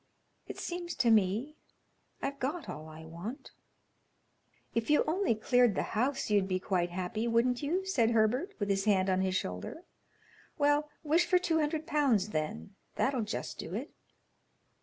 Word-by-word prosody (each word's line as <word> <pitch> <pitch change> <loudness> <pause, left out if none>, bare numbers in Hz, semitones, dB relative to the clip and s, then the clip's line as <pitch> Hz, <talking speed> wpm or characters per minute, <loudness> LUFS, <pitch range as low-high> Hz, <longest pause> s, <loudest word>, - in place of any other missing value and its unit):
"It - - -7
seems 350 0 -4
to 240 -3 +3
me 220 +8 +2 0.7
I've 280 +1 -3
got 290 +5 -2
all 155 +1 -7
I 160 +1 -10
want." 175 +11 -7 1.2
"If 230 +2 -1
you 300 - +5
only 340 - +1
cleared 245 0 +3
the - - 0
house, 255 +2 0
you'd 200 -2 +3
be 185 -1 0
quite 180 -2 0
happy, 185 +6 -2
wouldn't 240 +2 +2
you?" 350 +7 -1
said 250 -12 +2
Herbert, 235 - +1
with 205 -1 -1
his 195 0 0
hand 190 -3 +3
on 185 0 +2
his 190 -1 0
shoulder. 90 - -4 0.7
"Well, 290 +1 +2
wish 330 +3 +3
for 365 +1 +5
two 340 -3 +1
hundred 305 +1 -1
pounds, 265 - +2
then; 195 +4 -3 0.2
that 275 - +1
'll 255 - 0
just 210 -1 -4
do 170 - -5
it." 260 +8 -5
235 Hz, 165 wpm, -31 LUFS, 195-295 Hz, 1.2 s, you